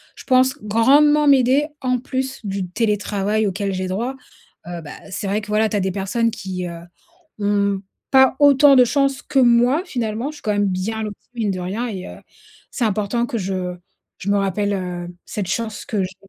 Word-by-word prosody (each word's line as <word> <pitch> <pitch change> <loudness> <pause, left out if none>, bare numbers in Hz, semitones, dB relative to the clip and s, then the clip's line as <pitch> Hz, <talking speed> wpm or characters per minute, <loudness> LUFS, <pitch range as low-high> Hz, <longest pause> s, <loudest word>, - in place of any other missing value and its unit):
je - - -12
pense, 260 +1 +3
grandement 290 +8 +4
m'aider, 275 +1 +4
en 255 -1 0
plus, 265 +1 -4
du 195 -2 -3
télétravail 210 0 0
auquel 200 0 -2
j'ai 185 0 -2
droit, 230 +8 -2 0.5
heu, 175 -1 -6
bah 150 - -9 0.2
c'est 195 - -4
vrai 205 +2 0
que, 210 - -10
voilà, 215 +1 +2
tu 210 - -1
as - - 0
des 190 0 -1
personnes 205 +5 0
qui, 185 -3 -5
heu, 170 -1 -7 0.6
ont 200 -1 +1 0.3
pas 265 -1 +6
autant 285 -1 +6
de 250 -1 +7
chance 275 +1 +1
que - - -3
moi 245 +5 +4
finalement, 235 - -3
je - - -14
suis - - -15
quand 215 - 0
même 205 0 +1
bien 195 +4 -2
lotie, 210 -2 -8
mine 220 -4 0
de 185 - -4
rien 205 +7 -3
et 190 -5 -6
heu, - - -10 0.5
c'est 250 - -2
important 215 +3 0
que 235 - -3
je 185 -2 -3 0.4
je 200 - -4
me 205 - +3
rappelle, 200 +1 0
heu, 180 -2 -4 0.2
cette 205 -3 -4
chance 220 +1 -3
que 205 -4 -1
j'ai. 185 0 -6
210 Hz, 200 wpm, -21 LUFS, 195-250 Hz, 0.6 s, de